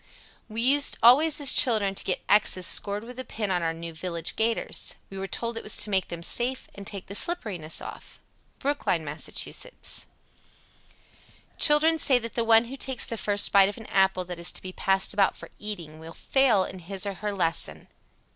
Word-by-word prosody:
"We 225 +2 -4
used 285 +3 +4
always 290 +7 +6
as 285 -2 +4
children 215 -7 +4
to - - -3
get 185 - -3
X's 195 -3 +3
scored 205 +4 0
with 250 +2 -11
a - - -4
pin 210 -5 -5
on 180 -1 0
our 165 -1 -1
new 165 0 -8
'village 170 0 -4
gaiters.' 225 +1 -2 0.2
We 195 - -8
were 195 - -5
told 230 +3 -4
it - - -5
was 215 - +2
to 210 - 0
make 190 -1 0
them 170 -1 -8
safe 245 +7 -1
and 200 0 -10
take 200 -3 -5
the 200 - -10
slipperiness 205 - 0
off." - - -11 0.4
Brookline, 285 +1 -2
Mass. - - -5
99. - - -2 1.9
Children 315 +2 +6
say 265 -3 +5
that 230 -1 -6
the 235 - -1
one 225 0 +4
who 265 +4 -9
takes 265 -2 -2
the 230 - -5
first 205 -2 +1
bite 195 -1 +5
of 205 - -8
an 225 - -11
apple 190 -2 +1
that 175 -1 -8
is 170 - +3
to - - -4
be 185 0 -8
passed 190 0 +1
about 200 -1 +1
for - - -11
eating 170 -7 -7
will 165 +1 -11
fail 250 -5 +1
in 190 0 -8
his 190 +3 -5
or 200 - -3
her 210 +3 -5
lesson. 165 - -1
205 Hz, 205 wpm, -25 LUFS, 185-240 Hz, 1.9 s, always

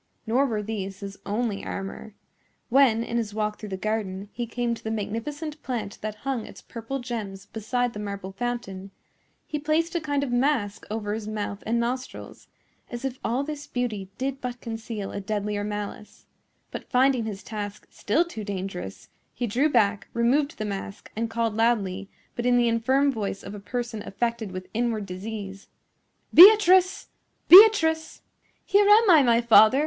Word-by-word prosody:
Nor 250 +5 +2
were 215 -4 -2
these 200 -2 -5
his 200 0 -8
only 210 0 -2
armor. 195 +2 -6 0.5
When, 245 -3 +4
in 235 - -3
his 215 -3 -3
walk 210 -1 -2
through 210 - -7
the 190 - -4
garden, 200 -1 -3
he 240 -1 -4
came 240 +1 -2
to 230 - -9
the 220 - -3
magnificent 285 +9 -4
plant 225 -6 -4
that 215 0 -4
hung 265 -5 -1
its - - -12
purple 230 +4 -6
gems 215 -6 -6
beside 235 +3 -2
the 210 - -7
marble 200 -2 -5
fountain, 195 -3 -5 0.6
he 300 - -4
placed 315 +3 0
a 340 - -1
kind 285 -2 -1
of 265 - -3
mask 245 -5 0
over 210 -1 -3
his 215 -1 -5
mouth 205 -1 -4
and 235 +1 +1
nostrils, 250 +2 -5 0.4
as 240 +2 -6
if 260 0 -4
all 245 +4 0
this 295 0 -6
beauty 215 -6 -3
did 270 +1 -3
but 245 -1 -5
conceal 225 -3 -6
a 200 - -5
deadlier 205 0 -2
malice; 210 0 -6 0.5
but, - - -8
finding 255 -2 +3
his 205 -3 -6
task 210 -2 -6
still 310 +12 +1
too 225 -11 -7
dangerous, 190 - -6 0.3
he 245 - -2
drew 255 +8 +1
back, 215 -6 +2
removed 280 +7 +1
the 215 - -3
mask, 200 0 -6
and 230 +1 -2
called 230 -1 -1
loudly, 200 -4 0 0.3
but 240 +1 -2
in 245 0 +4
the 240 -1 +3
infirm 260 +5 +2
voice 205 -5 -4
of 195 - -8
a 205 - -7
person 235 +1 -4
affected 230 0 -3
with 185 0 -7
inward 230 -2 -1
disease, 195 +1 -7 0.7
"Beatrice! 375 -1 +7 0.4
Beatrice!" 335 -5 +7 0.4
"Here 405 +1 +4
am 435 +2 +7
I, 315 -4 +8
my 235 -3 +4
father. 235 +2 +6
230 Hz, 170 wpm, -25 LUFS, 205-260 Hz, 0.7 s, I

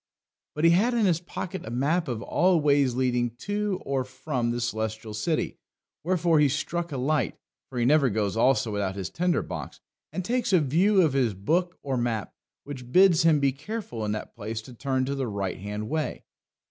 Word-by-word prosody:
But 150 - -2
he 165 - +7
had 225 +8 +3
in 225 -3 +3
his 170 -4 +3
pocket 185 0 -6
a - - -7
map 145 +9 0
of 120 -4 -3
all 180 +1 +3
ways 140 -4 +3
leading 125 -2 0
to 205 +6 -2
or 135 -1 0
from 130 -1 -3
the 120 +1 -1
Celestial 110 -2 -3
City, 155 +10 -1 0.4
wherefore 170 -2 +2
he 145 -1 +5
struck 170 +4 -2
a 140 - -3
light 135 -1 0 0.3
(for 130 - -7
he 120 - +2
never 140 0 +4
goes 105 -2 -1
also 115 -1 +3
without 100 -2 -2
his 95 -2 -4
tinder 180 0 +1
box), - - -7 0.3
and 185 - -4
takes 240 -2 0
a 180 - +7
view 180 +7 +3
of 155 -5 +2
his 125 -7 +1
book 175 - 0
or 135 -2 -1
map, 115 -4 -2 0.3
which 130 -4 -8
bids 185 -1 +6
him 160 -2 +4
be 140 -1 +3
careful 145 - -6
in 105 - -1
that 110 - -6
place 110 0 -5
to 125 - -12
turn 130 +1 -1
to 140 - -2
the 135 -2 -2
right 100 -4 -3
hand 105 +2 -5
way. 155 +3 -2
135 Hz, 200 wpm, -26 LUFS, 120-170 Hz, 0.4 s, he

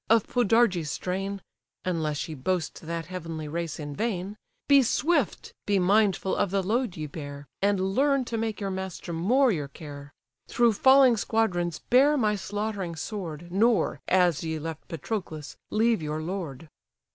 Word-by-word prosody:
of 225 -1 +5
Podarges' 225 -8 +2
strain, 195 +3 -3 0.4
(Unless 160 -5 -1
ye 160 - -6
boast 160 +4 -2
that 165 -1 -3
heavenly 165 -4 -6
race 165 0 -4
in 145 -1 -6
vain,) 205 -2 -2 0.3
Be 280 -1 +7
swift, 290 - 0
be 205 -1 +3
mindful 195 0 +2
of - - +1
the 195 +1 0
load 225 0 -1
ye 155 - -3
bear, 145 -1 -8 0.2
And 195 -1 +1
learn 275 +1 +2
to 235 - -4
make 220 -2 -2
your 200 -2 -2
master 190 -2 -5
more 240 +11 +3
your 150 -7 -2
care: 145 0 -10 0.4
Through 235 -2 +3
falling 265 +1 +6
squadrons 175 -7 0
bear 280 +4 +6
my 215 -5 +2
slaughtering 205 -3 -3
sword, 170 -2 -6
Nor, 220 +4 +2
as 180 -4 +3
ye 160 -1 -2
left 160 +1 -6
Patroclus, 165 -3 -5
leave 225 -2 +2
your 155 0 -3
lord." 165 -4 -5
190 Hz, 155 wpm, -27 LUFS, 165-220 Hz, 0.4 s, Be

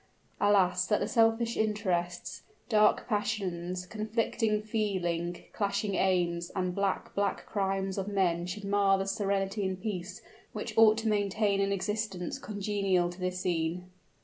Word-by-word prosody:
Alas! 190 -3 +3
that 210 - +2
the - - -1
selfish 230 0 +2
interests, 190 -5 -1 0.3
dark 210 -2 +4
passions, 185 -5 -2
conflicting 215 +1 0
feeling, 175 -6 -2
clashing 200 0 -1
aims, 175 -3 +1
and 185 -2 -1
black, 200 0 -1
black 200 0 -1
crimes 195 -1 -1
of 195 - -3
men 180 -4 +1
should 200 +3 -5
mar 200 -1 +3
the 195 - -2
serenity 195 0 -1
and 190 -1 -2
peace 185 -2 -5 0.3
which - - -5
ought 220 -1 +7
to 225 0 -2
maintain 205 -1 +1
an 200 0 +1
existence 200 -2 -2
congenial 195 -4 0
to 175 - -12
this 185 0 -2
scene! 175 +1 -2
195 Hz, 140 wpm, -30 LUFS, 180-210 Hz, 0.3 s, ought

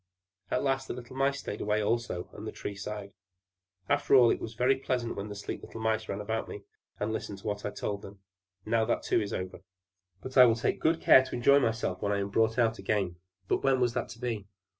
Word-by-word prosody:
At - - 0
last 135 -1 0
the - - -4
little 125 +1 -10
Mice 135 +1 +1
stayed 105 - -5
away 105 +1 +1
also; 110 -4 -1
and - - -8
the - - -4
Tree 100 - -6
sighed: 100 0 -6 0.7
"After 145 -1 +3
all, 120 -3 +7
it - - 0
was 115 0 -6
very 130 +3 +3
pleasant 125 -3 -2
when 100 - -4
the 105 - -6
sleek 100 - -5
little - - -9
Mice 110 0 0
sat 100 - -3
round 110 0 -1
me, 100 - -8 0.4
and 110 +1 -1
listened 105 -2 -4
to 100 - -16
what 105 -1 -3
I - - 0
told 100 0 -4
them. 100 +1 -11 0.5
Now 115 +1 +2
that 120 - 0
too - - +2
is 100 - -4
over. 95 -1 -4 0.6
But 130 +1 -5
I 125 - +11
will 115 - +3
take 115 - -1
good 160 +1 +2
care 130 - +8
to - - -6
enjoy 140 +4 +5
myself 115 -7 -1
when 100 - 0
I 100 - +1
am 100 0 -2
brought 110 +2 +2
out 115 -2 +2
again." 95 -5 -1 0.3
But - - 0
when 135 -1 +3
was 120 -2 +2
that - - -2
to 115 +1 -10
be? 115 -5 -3
110 Hz, 240 wpm, -30 LUFS, 105-125 Hz, 0.7 s, I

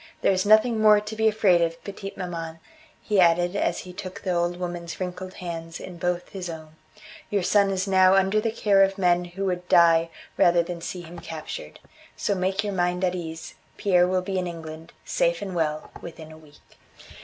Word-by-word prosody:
There's 190 +1 +2
nothing 220 +1 +5
more 210 -1 +7
to 210 +1 -7
be 220 0 +2
afraid 210 -5 +3
of, 165 0 -1
petite 195 0 -8
maman," 165 -3 -5 0.5
he 210 -2 +1
added 175 +1 +3
as - - 0
he 180 - -11
took 185 -1 -8
the 185 - -1
old 175 0 0
woman's 175 -1 -5
wrinkled 185 0 -5
hands 165 -2 -6
in 180 -2 -9
both 175 0 -2
his 185 -3 -6
own; 160 -1 -8 0.6
"your 200 -3 0
son 200 +2 +3
is 190 0 -1
now 190 0 +5
under 195 +2 +3
the 225 - 0
care 205 -3 +3
of 195 0 +3
men 180 -2 +2
who 185 +3 -5
would 180 -1 -3
die 165 -1 +5 0.3
rather 175 0 +5
than 170 0 -6
see 180 +1 -5
him 170 0 -10
captured. 155 - -8 0.4
So 205 - 0
make 190 +2 -1
your 205 -1 -3
mind 180 0 0
at 180 -1 +1
ease, 165 -2 -6 0.2
Pierre 180 -3 +3
will 185 0 0
be 190 0 -2
in 180 - -2
England, 165 -1 -8
safe 170 0 +1
and 195 -2 -5
well, 155 -3 -2
within 160 -2 -10
a 155 - -12
week." 150 -1 -21
180 Hz, 200 wpm, -25 LUFS, 170-195 Hz, 0.6 s, more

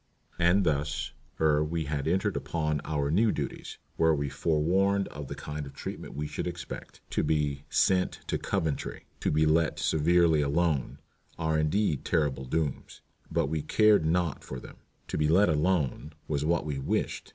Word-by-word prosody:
And 90 +3 +4
thus, 75 -2 -1 0.3
ere 75 -1 +3
we 80 +1 -2
had 70 0 -2
entered 95 +4 +1
upon 75 -3 -1
our 75 -2 -1
new 105 +6 +4
duties, 70 - -5 0.2
were 80 -1 +4
we 70 -1 -2
forewarned 90 +7 +1
of 70 -1 -7
the - - -6
kind 75 -1 -6
of 70 - -12
treatment - - -7
we 75 +2 -3
should 75 - -4
expect. 85 0 -7
To - - +1
be 75 -2 0
"sent 95 -1 +2
to - - -2
Coventry," 80 -7 -2
"to - - 0
be 80 +1 +3
let 80 +1 +2
severely 80 0 +3
alone," 75 -1 0 0.4
are 80 -1 +1
indeed 75 0 +1
terrible 70 -4 0
dooms, 75 0 -3 0.3
but - - +1
we 80 +2 -2
cared 105 +4 +4
naught 85 -1 0
for 65 - -6
them. - - -12 0.3
"To - - -3
be 75 - +3
let 90 +5 +5
alone" 75 -2 0
was 75 -2 -1
what 85 +1 +1
we 75 -3 -3
wished. 65 - -2
80 Hz, 170 wpm, -29 LUFS, 75-85 Hz, 0.4 s, let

